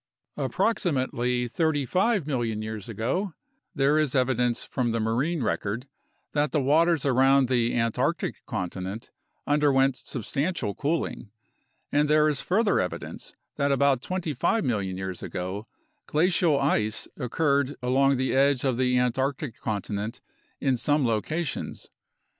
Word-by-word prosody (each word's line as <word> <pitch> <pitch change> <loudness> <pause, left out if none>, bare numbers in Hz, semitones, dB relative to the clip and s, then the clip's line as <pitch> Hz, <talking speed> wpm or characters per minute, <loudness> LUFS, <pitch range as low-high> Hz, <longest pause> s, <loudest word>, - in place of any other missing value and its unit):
Approxi 225 -6 0
mately 125 -2 -1
35 165 - +1
million 120 -7 -1
years 110 -1 -6
ago 135 - -2 0.4
there 140 +3 +3
is 150 -4 0
evidence 125 -2 +1
from 125 -3 -1
the 115 - 0
marine 125 +8 0
record 110 +4 -2 0.4
that 145 -2 +1
the 150 - +2
waters 160 +3 +3
around 135 0 +4
the 120 -2 +1
Antarctic 125 +8 -1
continent 95 +4 -4 0.3
underwent 140 -3 +3
substantial 135 - -3
cooling, 145 -6 -2 0.6
and 145 0 +2
there 155 0 +5
is 150 -3 0
further 205 +3 +2
evidence 90 - -5 0.2
that 140 -1 +1
about 140 -2 +3
25 185 +5 -1
million 100 -6 -1
years 95 -1 -5
ago 95 +4 -5 0.4
glacial 165 -2 +3
ice 110 -6 +1
occurred 140 +1 +1
along 135 +2 +3
the 130 +1 0
edge 135 -1 +3
of 130 -3 +1
the 125 0 +2
Antarctic 130 +1 -1
continent 105 0 -3 0.4
in 135 -3 +1
some 145 +2 +1
locations. 140 +8 -2
135 Hz, 125 wpm, -26 LUFS, 115-150 Hz, 0.6 s, there